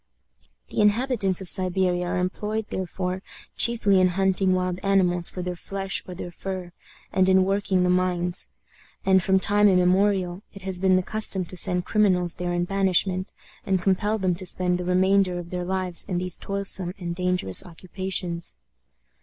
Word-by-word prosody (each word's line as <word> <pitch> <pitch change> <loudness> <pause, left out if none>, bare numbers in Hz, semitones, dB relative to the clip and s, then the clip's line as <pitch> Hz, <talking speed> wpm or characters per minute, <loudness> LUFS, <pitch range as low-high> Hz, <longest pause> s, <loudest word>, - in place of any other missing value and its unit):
The - - -1
inhabitants 210 -3 +1
of 190 - -8
Siberia 180 -1 +1
are 175 - -2
employed, 210 +4 -2
therefore, 185 0 -3 0.3
chiefly 205 -5 +4
in 185 - +5
hunting 190 +1 +1
wild 180 0 -2
animals 180 -3 +1
for 180 - -6
their 180 0 -4
flesh 195 +2 -3
or 180 - -7
their 175 0 -7
fur, 185 0 -6 0.4
and 190 0 +3
in 190 0 +4
working 195 -1 0
the 180 - +1
mines; 180 -1 +1 0.6
and, 190 -1 +4
from 190 +1 +2
time 205 +2 +3
immemorial, 185 0 +2
it 195 - -11
has 190 -2 0
been 190 0 +3
the 185 - +2
custom 200 -3 -1
to 185 - -9
send 180 0 +2
criminals 180 -5 +2
there 180 0 -4
in 175 0 0
banishment, 190 -1 +1 0.3
and 190 -1 0
compel 205 +3 +1
them 185 -3 0
to 185 - -4
spend 180 0 -1
the 180 - -4
remainder 185 0 +2
of 175 -1 -8
their 180 -1 -3
lives 185 -1 +4
in 185 -4 -3
these 180 -1 -2
toilsome 195 -2 -2
and 175 -3 -5
dangerous 180 - 0
occupations. 180 0 -4
185 Hz, 170 wpm, -24 LUFS, 180-195 Hz, 0.6 s, in